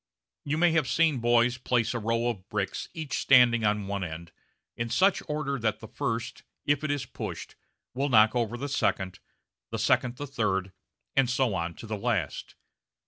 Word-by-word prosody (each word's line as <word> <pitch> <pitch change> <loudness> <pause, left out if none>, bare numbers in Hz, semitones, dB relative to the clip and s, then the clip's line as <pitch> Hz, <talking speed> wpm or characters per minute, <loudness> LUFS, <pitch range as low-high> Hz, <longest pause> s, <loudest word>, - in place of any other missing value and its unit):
You 145 +2 -1
may 175 +1 +4
have 160 -4 +2
seen 160 -5 +2
boys 120 +1 +3
place 120 -2 +1
a 120 - -2
row 115 +2 0
of 100 -5 -4
bricks, 100 -3 -3
each 155 -3 -3
standing 120 -3 +5
on 105 -1 +1
one 100 0 -3
end, 85 0 -7 0.4
in 115 0 -3
such 190 - +3
order 150 -3 -2
that 110 -2 -1
the 110 - -10
first, 115 +3 -3 0.2
if 145 0 +1
it 155 - -1
is 145 -3 -1
pushed, - - -7 0.4
will 135 +3 -1
knock 110 -1 +5
over 120 -1 0
the 140 +4 -4
second, 95 -8 -1 0.5
the - - -3
second 125 -1 +2
the 145 - -5
third, 100 -8 -1 0.4
and 135 -3 +3
so 130 -3 +1
on 85 -2 -3
to - - -10
the 110 -1 -4
last. - - -2
120 Hz, 185 wpm, -28 LUFS, 105-140 Hz, 0.5 s, standing